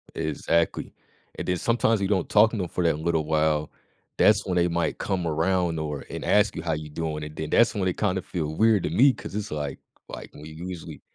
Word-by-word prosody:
Exactly, 80 +1 -1 0.4
and - - -5
then 90 -1 +1
sometimes 115 -1 +1
you 95 - +1
don't 95 -4 0
talk 110 +1 +5
to 115 - -3
'em 90 - -2
for 90 - -2
that 80 -2 +1
little 80 -2 0
while, 75 -1 +1 0.5
that's 105 -1 +4
when 90 -2 -1
they 85 0 +3
might 85 0 -1
come 90 -3 -1
around, 85 +1 0
or 75 -2 -4
and - - -6
ask 105 0 +3
you, 85 - -4
"How 80 -1 -1
you 75 0 -5
doing?" 75 -1 -4
and 75 0 -8
then 80 -1 -4
that's 120 - +4
when 95 -3 -1
it 90 - -1
kinda 95 -3 0
feel 80 -3 -4
weird 110 -2 +3
to - - -1
me 130 +8 +5
'cause - - -9
it's 105 -3 -4
like 75 -2 -4 0.3
like, - - -8
when 75 - -11
usually 85 +3 -8
85 Hz, 225 wpm, -25 LUFS, 80-95 Hz, 0.5 s, talk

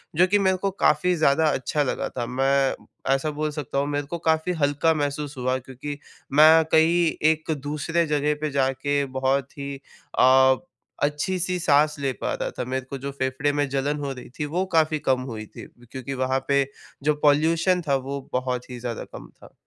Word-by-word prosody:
जो 180 +4 +5
कि 205 +2 +3
मेरे 190 -1 +2
को 195 +1 -1
काफ़ी 180 -1 +2
ज़्यादा 155 -1 +3
अच्छा 145 +2 0
लगा 135 - -2
था, 120 -2 -4
मैं 135 +2 +1 0.4
ऐसा 150 +3 -2
बोल 150 +1 -2
सकता 145 -3 -5
हूँ 140 - 0
मेरे 145 -1 -2
को 170 +4 -4
काफ़ी 160 +3 +2
हल्का 145 +3 +2
महसूस 145 -1 -3
हुआ 130 +1 0
क्योंकि 135 +3 -7 0.4
मैं 155 +2 +7
कहीं 170 +2 +4 0.3
एक 160 0 -3
दूसरे 150 +3 -1
जगह 150 0 +1
पे 155 - -1
जाके 140 +1 0 0.2
बहुत 135 +1 0
ही 140 0 -4 0.4
अ, 130 +1 +6 0.5
अच्छी-सी 180 +5 -1
साँस 150 -2 +3
ले 135 -2 -1
पा - - -1
रहा - - -3
था, - - -1
मेरे 130 0 -3
को 140 - -4
जो 140 +1 -5
फेफड़े 130 +1 -1
में 145 -1 0
जलन 140 +2 -1
हो 140 -1 -3
रही 125 -2 -11
थी 150 - 0
वो 175 +6 -1
काफ़ी 155 -1 +2
कम 130 -1 +3
हुई 110 -1 -6
थी, - - -11 0.3
क्योंकि 130 0 -5
वहाँ 130 0 -1
पे 140 -1 +3 0.4
जो 150 0 +2
पॉल्यूशन 165 +5 +3
था 140 - +3
वो 140 - -3
बहुत 125 -1 -2
ही 125 - -7
ज़्यादा 120 -1 -4
कम - - -10
था। - - -18
145 Hz, 190 wpm, -24 LUFS, 135-155 Hz, 0.5 s, मैं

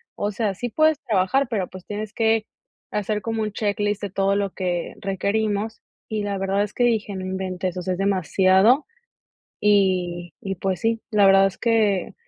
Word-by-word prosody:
O 205 +1 -2
sea, 205 -2 -1
sí 245 +4 -4
puedes 310 +4 +3
trabajar, 230 +3 +1
pero 200 -6 -1
pues 185 -1 -12
tienes 210 0 -5
que 225 -1 +2 0.4
hacer 210 0 -2
como 225 -1 -2
un 215 -1 -2
checklist 205 0 -1
de 205 - -3
todo 195 0 +1
lo 200 -2 -1
que 175 -2 -2
requerimos. 205 +2 -1 0.3
Y 215 -1 -2
la 200 -1 -2
verdad 195 +1 0
es 210 - -6
que 245 - +2
dije: 220 -3 0
"No 185 - -5
inventes, 185 -1 -3
o - - -2
sea, 185 +1 -2
es - - -4
demasiado". 195 - +3 0.8
Y 180 -4 +1 0.3
pues 190 -3 -1
sí, 225 0 0
la 205 -1 +5
verdad 195 0 +6
es 195 - -3
que 215 -5 +1
200 Hz, 180 wpm, -23 LUFS, 190-220 Hz, 0.8 s, verdad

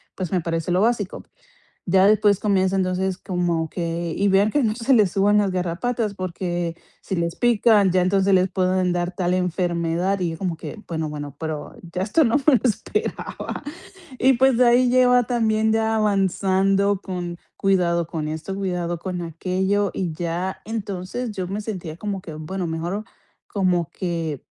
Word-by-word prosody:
pues 185 -4 -4
me 185 - +2
parece 165 +1 -2
lo 180 - +3
básico. 220 -4 0 0.7
Ya 190 +1 +5
después 205 -2 +4
comienza, 195 -2 +2
entonces, 185 0 0
como 175 -4 -1
que: 170 -1 -3
"Y 200 - +1
vean 195 +2 +4
que 290 +5 +1
no 215 -1 +1
se 230 +3 0
le 215 -5 +6
suban 200 +3 +3
las 200 -2 +1
garrapatas, 200 +5 -1
porque, 175 -2 -3 0.2
si - - -4
les 170 -1 -1
pican, 220 -5 +4
ya 185 0 +3
entonces 195 +1 +3
les 185 0 +3
pueden 185 -1 +1
dar 175 +1 -2
tal 180 0 0
enfermedad", 180 +1 0
y 180 -2 -1
yo 160 - -6
como 180 -4 -2
que: 215 +6 -8
"Bueno, 160 -2 -2
bueno, 145 -2 -7
pero 155 -2 -5 0.2
ya 185 - -1
esto 260 +11 +3
no 230 +1 +3
me 285 +1 +4
lo - - -2
esperaba". 235 - -3 0.6
Y, 265 +2 +5
pues, 260 -1 +3
de 250 - +5
ahí 245 +1 +5
lleva 250 0 +5
también 220 -2 +2
ya 220 0 +1
avanzando 195 -1 +2
con: 175 -3 -5 0.2
"Cuidado 175 -4 +1
con 160 -3 -3
esto, 160 +5 -4
cuidado 180 -3 -2
con 180 0 -4
aquello", 190 +4 -1
y 180 -4 -2
ya, 175 +3 -3
entonces, 215 +2 -4
yo 190 -3 -4
me 195 +3 -3
sentía 185 -7 -6
como 200 +1 -4
que: 165 -3 -9
"Bueno, 175 +4 -4
mejor 170 +6 -3 0.4
como 180 -5 0
que 165 -6 -3
185 Hz, 175 wpm, -23 LUFS, 175-210 Hz, 0.7 s, le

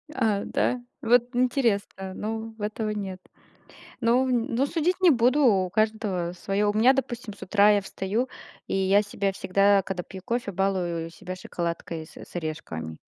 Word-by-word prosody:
А, 220 -6 +1
да, 250 - 0 0.2
вот 245 +2 +3
интересно, 230 -7 0
но 225 +2 -4
в - - -12
этого 215 +1 -2
нет. 195 -3 -4 0.8
Но 240 +3 +3
но 245 0 +1
судить 340 +5 0
не 365 - +7
буду, 260 +1 +4
у 190 -6 +3
каждого 215 -4 0
своё. 200 +3 0
У - - -8
меня, 245 +5 +6
допустим, 240 -5 -3
с 200 - -18
утра 205 +2 +4
я 205 -1 +3
встаю, 200 +6 -2 0.4
и - - -3
я 195 +1 +4
себя 200 -1 -2
всегда, 200 +1 +3
когда 180 -1 -4
пью 190 +1 -10
кофе, 235 -1 -2
балую 180 -3 -1
себя 180 +2 -8
шоколадкой 170 -2 -4
с - - -17
с - - -12
орешками. 115 - -5
205 Hz, 165 wpm, -26 LUFS, 190-235 Hz, 0.8 s, не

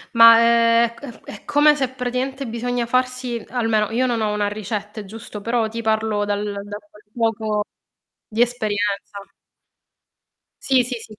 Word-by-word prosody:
Ma, 230 0 +9
ehm, 230 0 +4
è - - -15
c 240 -1 -12
è 205 - -10
come 295 +1 +4
se 270 -3 -1
praticamente 260 +2 -3
bisogna 240 +1 -2
farsi 255 -1 -1
almeno 225 -4 0
io 240 +3 0
non 240 -3 0
ho 215 -1 0
una 210 -1 0
ricetta, 210 +1 -5
è 210 - -7
giusto? 210 0 -9
Però 230 +1 0
ti 230 +1 -5
parlo 220 -1 0
dal 205 0 -1
da 205 +1 -6
quel 210 -8 -20
poco 220 -2 0 0.6
di 225 +2 -1
esperienza 205 -4 -2 1.5
Sì, 265 -2 +4
sì, 250 +1 -3
sì, 225 -1 -11
230 Hz, 160 wpm, -21 LUFS, 210-245 Hz, 1.5 s, Ma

